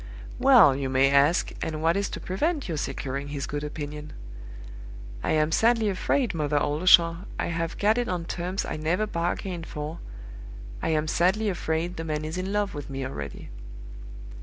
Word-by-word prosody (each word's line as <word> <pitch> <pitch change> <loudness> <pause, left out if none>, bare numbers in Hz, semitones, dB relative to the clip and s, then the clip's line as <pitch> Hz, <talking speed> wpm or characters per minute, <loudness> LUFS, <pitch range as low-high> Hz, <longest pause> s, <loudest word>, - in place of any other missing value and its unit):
"Well, 250 - +7
you 135 -1 -2
may 135 +1 +3
ask, 140 +5 +3
and 160 -2 -3
what 165 +2 +2
is 200 0 -1
to - - -6
prevent 295 - -1
your 165 -4 -3
securing 140 -1 -4
his 145 -1 -4
good 145 0 -4
opinion? 150 0 -6 1.1
I - - 0
am 155 0 +2
sadly 225 +2 +3
afraid, 200 +4 0
Mother 150 -2 0
Oldershaw, 165 +3 +5 0.2
I - - -1
have 165 0 -3
got 215 +3 +3
it 245 - -1
on 175 -2 -2
terms 180 +3 -3
I - - -4
never 165 +7 0
bargained 175 -2 -3
for 150 +3 -6 0.8
I - - -1
am 155 -1 +1
sadly 190 +7 +2
afraid 175 -1 -2
the 165 - -4
man 155 -1 -3
is 160 +4 -4
in 190 +1 -3
love 205 -1 0
with 145 -1 -7
me 135 -1 -4
already. 70 - -7
165 Hz, 175 wpm, -26 LUFS, 150-190 Hz, 1.1 s, Well